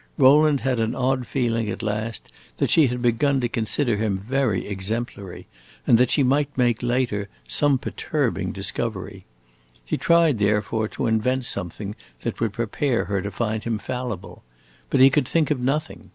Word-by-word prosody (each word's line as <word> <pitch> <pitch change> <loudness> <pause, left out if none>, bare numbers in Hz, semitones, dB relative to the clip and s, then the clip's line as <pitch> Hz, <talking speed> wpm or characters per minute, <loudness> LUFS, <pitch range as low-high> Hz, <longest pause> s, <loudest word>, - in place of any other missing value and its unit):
Rowland 145 +1 +5
had 130 -3 0
an 115 +1 0
odd 130 -1 0
feeling 115 -4 0
at 115 - -5
last 110 +1 -3 0.3
that - - +1
she 155 -4 +6
had 125 0 -3
begun 135 +4 +2
to 120 - 0
consider 115 +1 -1
him 105 -2 0
very 130 -7 0
exemplary, 100 -1 -5 0.4
and 115 - +5
that 125 -1 +4
she 145 - +3
might 140 +2 +1
make, 120 -3 +2
later, 120 -5 -1 0.2
some 135 - +3
perturbing 140 0 -2
discovery. 100 -1 -4 0.6
He - - -1
tried, 165 -7 +3
therefore, 105 +1 +1
to - - -4
invent 120 +3 +1
something 100 +1 -4 0.3
that - - -4
would 115 -3 -1
prepare 120 +3 -1
her 100 +1 -1
to 100 - -4
find 110 0 -2
him 115 -2 -1
fallible. 105 -6 -5 0.5
But 135 - +2
he 135 +1 +8
could 135 -2 +1
think 155 0 +1
of 145 - +1
nothing. 145 +5 -2
120 Hz, 165 wpm, -23 LUFS, 105-135 Hz, 0.6 s, he